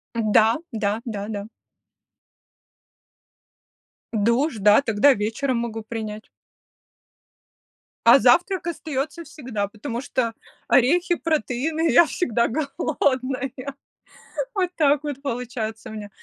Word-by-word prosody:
Да, 220 0 +3 0.2
да, 215 0 -1
да-да. 205 -2 -5 2.7
Душ, 235 +5 +1
да, 210 +6 +5
тогда 245 +4 +4
вечером 230 +5 -1
могу 225 -2 -4
принять. 215 -1 -6 1.8
А 240 +4 +9
завтрак 345 - +3
остается 315 0 -4
всегда, 230 -11 -4
потому 230 +3 -5
что 250 -3 -1 0.4
орехи, 340 +7 +3
протеины 315 +1 -1
я 340 - +6
всегда 235 -10 0
голодная, 270 -2 -1 1.0
вот 365 -2 +1
так 295 -2 +3
вот 285 -2 -5
получается 230 -4 -4
у 220 - -8
меня. 210 -1 -7
245 Hz, 95 wpm, -23 LUFS, 220-290 Hz, 2.7 s, А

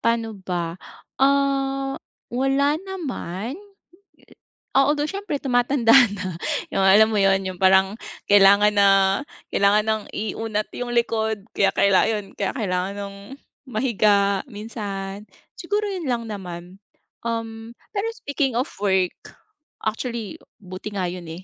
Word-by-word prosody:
paano 230 -1 0
ba? 175 -2 -4 0.4
Ah, 275 0 +1 0.3
wala 275 +4 +1
naman. 265 - -5 1.2
Oo, 275 +1 +4
although 295 0 0
siyempre 395 -7 -3
tumatanda 245 -2 +3 0.2
na, 185 -3 -5 0.4
yung, 195 - 0
alam 215 +3 +6
mo 210 - +1
'yon, 195 0 +3
yung 185 -1 -6
parang 190 +2 +4 0.4
kailangan 205 +1 +6
na 200 -1 +5 0.6
kailangan 205 +2 +3
ng 220 -1 0
iunat 215 0 -2
yung 245 -1 -3
likod, 220 -3 0
kaya 195 - +3
kaila 200 -2 +4
'yon, 210 -3 -3
kaya 200 +6 -2
kailangan 190 -3 -2
ng 200 -1 -6 0.5
mahiga 210 -4 +2
minsan. 205 -3 -6 0.3
Siguro 410 +4 -1
'yon 355 -7 -4
lang 240 -2 -1
naman. 180 -2 -8 0.5
Um, 225 0 -5 0.2
pero 405 +3 0
speaking 280 - -2
of 260 +5 0
work, 190 -3 +2 0.7
actually 225 -1 -3 0.2
buti 185 +3 -7
nga 185 -2 -1
'yon 175 -2 -8
eh, 175 +3 -9
215 Hz, 125 wpm, -23 LUFS, 195-255 Hz, 1.2 s, alam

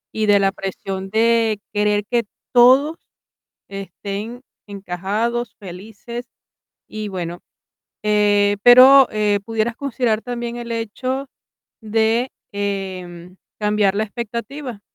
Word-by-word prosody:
Y 215 -1 0
de 205 -1 +6
la 195 0 +2
presión 195 0 -5
de 225 0 +2
querer 210 0 +1
que 240 +2 +1 0.3
todos 260 +6 +5 0.7
estén 200 +4 -6 0.2
encajados, 205 +5 -3
felices 215 +5 -8 0.6
y, 215 -1 -5
bueno, 175 -3 -5 0.6
eh, 205 -1 +3
pero, 260 +3 +9
eh 210 -1 +1
pudieras 225 +1 -1
considerar 245 -5 -1
también 240 -1 -5
el 235 -1 -6
hecho 255 +4 -3 0.6
de, 225 +3 +1 0.2
em, 185 -3 -5 0.2
cambiar 210 -2 +1
la 215 - +1
expectativa 235 +3 -6
215 Hz, 105 wpm, -20 LUFS, 200-235 Hz, 0.7 s, pero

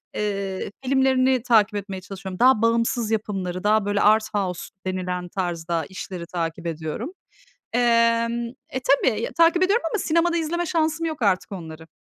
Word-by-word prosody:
eee, 200 -2 -3
filmlerini 260 -1 +3
takip 220 -4 +3
etmeye 195 -2 -5
çalışıyorum, 190 -1 -8
daha 255 -3 +5
bağımsız 230 0 +1
yapımları, 190 -4 -2
daha, 210 0 +3
böyle, 205 0 0
"Art 215 +1 +3
House" 190 -4 -1 0.2
denilen 180 -1 -3
tarzda 170 -3 -2
işleri 185 0 -7
takip 165 -1 -3
ediyorum, 165 - -4 0.6
emm 230 0 +2 0.2
E, 260 - -3
tabii, 255 -4 +2
takip 335 +2 +5
ediyorum 400 +5 +2
ama 425 - -1
sinemada 335 +1 +2
izleme 340 +2 -1
şansım 320 0 0
yok 315 -4 -4
artık 200 0 +1
onları. 160 -4 -8
215 Hz, 145 wpm, -23 LUFS, 185-260 Hz, 0.6 s, daha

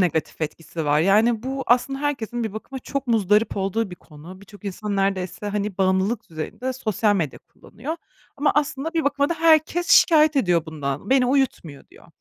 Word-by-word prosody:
negatif 165 -4 -1
etkisi 160 +1 -5
var? 145 +1 +3
Yani, 215 +6 +3
bu 270 +1 -3
aslında 250 +3 +2
herkesin 240 -5 -2
bir 220 - -4
bakıma 240 +5 -7
çok 275 +1 -4
muzdarip 215 -1 +2
olduğu 195 +2 -1
bir - - -7
konu. 165 +5 -13
Birçok 205 +1 -16
insan 200 +1 -4
neredeyse, 195 0 -1
hani, 205 -1 -3
bağımlılık 190 +4 0
düzeyinde 210 +11 -4
sosyal 215 -4 0
medya 160 -7 -2
kullanıyor. 275 +10 -8 0.4
Ama 290 +1 +2
aslında 295 +2 -1
bir 325 -2 +1
bakıma 285 0 +1
da 340 - 0
herkes 325 +1 +3
şikâyet 310 -3 +6
ediyor 175 - +2
bundan, 145 - -5
beni 260 -2 +4
uyutmuyor 250 - -1
diyor. - - -18
215 Hz, 170 wpm, -23 LUFS, 185-270 Hz, 0.4 s, şikâyet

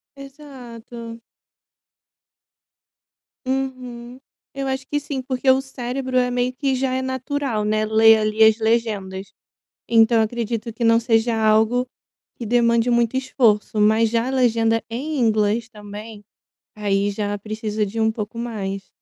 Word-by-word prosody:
Exato. 245 -5 -11 2.2
Uhum. 255 -2 -4 0.3
Eu 275 0 -4
acho 265 0 -3
que 290 - -1
sim, 275 -2 -5
porque 260 +1 -1
o 260 +1 +5
cérebro 260 0 -4
é 250 0 +2
meio 245 +1 0
que 270 +1 -1
já 260 0 -1
é 260 - -1
natural, 260 -3 -2
né, 215 +1 0
ler 220 +1 +6
ali 215 0 +2
as 220 0 +6
legendas. 215 -4 -1 0.6
Então, 225 0 +4
acredito 230 0 -3
que 235 - -4
não 230 0 +5
seja 225 0 +1
algo 220 +3 +2 0.5
que 235 - -7
demande 235 +1 +2
muito 235 0 +1
esforço. 225 -5 +1
Mas 220 +2 +4
já 230 +1 0
a - - -2
legenda 230 -3 +2
em 280 +6 -3
inglês 220 0 +1
também, 210 0 -10 0.5
aí 205 -1 0
já 205 0 -3
precisa 215 0 -3
de 220 +3 -5
um 220 0 +2
pouco 215 +1 -6
mais. 195 -5 -5
230 Hz, 140 wpm, -21 LUFS, 215-255 Hz, 2.2 s, ler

